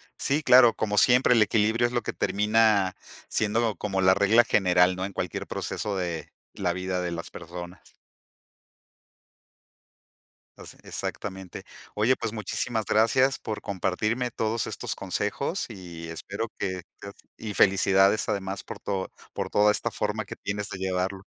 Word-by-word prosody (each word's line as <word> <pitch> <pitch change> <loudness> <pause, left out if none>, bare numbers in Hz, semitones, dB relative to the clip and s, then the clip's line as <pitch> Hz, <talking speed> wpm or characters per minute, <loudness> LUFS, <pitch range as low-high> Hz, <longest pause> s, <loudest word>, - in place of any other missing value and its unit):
Sí, 145 +3 0
claro. 125 -3 +7
Como 105 -1 -1
siempre, 125 +2 +5
el 115 - +4
equilibrio 110 +2 +2
es 120 - -8
lo 120 - +1
que - - -4
termina 105 -2 +2 0.3
siendo 110 +1 0
como 95 +1 -2
la 95 0 +6
regla 100 +4 +5
general, 90 -2 +3
¿no? 95 +1 -3
En 100 - -7
cualquier 90 -2 -4
proceso 105 -2 -3
de 85 -3 -4 0.2
la 90 -3 -1
vida 90 0 -2
de 90 -1 -3
las 85 0 -5
personas. 85 +1 -10 2.6
O - - -10
se - - -11
exactamente. 95 -3 -6 0.3
Oye, 110 +5 +3
pues, 110 - -4
muchísimas 110 +1 -2
gracias 130 +5 +3
por 110 -1 -5
compartirme 105 +6 -1
todos 115 0 -1
estos - - -4
consejos 105 - -2
y 85 -6 -9
espero 100 +7 -5
que 95 -1 -3 0.2
tengas 100 - -9 0.2
y 110 -2 -5
felicidades 95 +1 +4
además 100 -2 -3
por - - -8
todo 95 -2 -3 0.2
por - - -4
toda 105 0 +4
esta - - -2
forma 105 +1 -2
que - - -8
tienes 105 0 -4
de 95 - -7
llevarlo. 95 0 -2
100 Hz, 150 wpm, -26 LUFS, 95-110 Hz, 2.6 s, claro